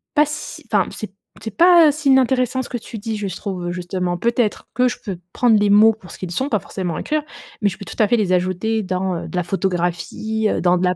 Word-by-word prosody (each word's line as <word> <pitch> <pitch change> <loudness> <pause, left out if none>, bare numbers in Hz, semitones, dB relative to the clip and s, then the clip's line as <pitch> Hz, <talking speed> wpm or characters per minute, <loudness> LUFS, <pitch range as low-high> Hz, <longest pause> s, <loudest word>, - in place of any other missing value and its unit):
pas 300 0 +5
si 300 0 -6
enfin, - - +3
c'est 210 -3 -7 0.3
c'est 220 -3 -7
pas 340 -3 +7
si 295 -1 -1
inintéressant 260 -1 +3
ce - - -9
que 245 - -3
tu 230 0 -9
dis, 220 +1 -4
je 205 -1 -3
se 185 - -6
trouve, 180 -4 -4
justement, 180 0 -3
peut-être 230 +2 0
que 250 +2 +3
je - - -5
peux 195 -5 -4 0.2
prendre 235 -3 +4
les 205 0 +2
mots 215 +2 +6
pour 190 -6 -14
ce - - -10
qu'ils 185 -2 -5
sont, 265 +11 -1
pas 215 - +1
forcément 185 -3 -4
écrire. 305 0 -1 0.4
Mais 205 - +3
je 190 - -8
peux 200 - -9
tout - - -9
à 215 - +5
fait 240 - +4
les 195 -4 +1
ajouter 185 +5 0
dans, 185 0 -2
heu, - - -6
de - - -8
la 180 - +1
photographie, 190 +4 -1
heu, - - 0
dans 180 0 +3
de 180 - -2
la 180 0 +1
210 Hz, 260 wpm, -20 LUFS, 185-240 Hz, 0.4 s, pas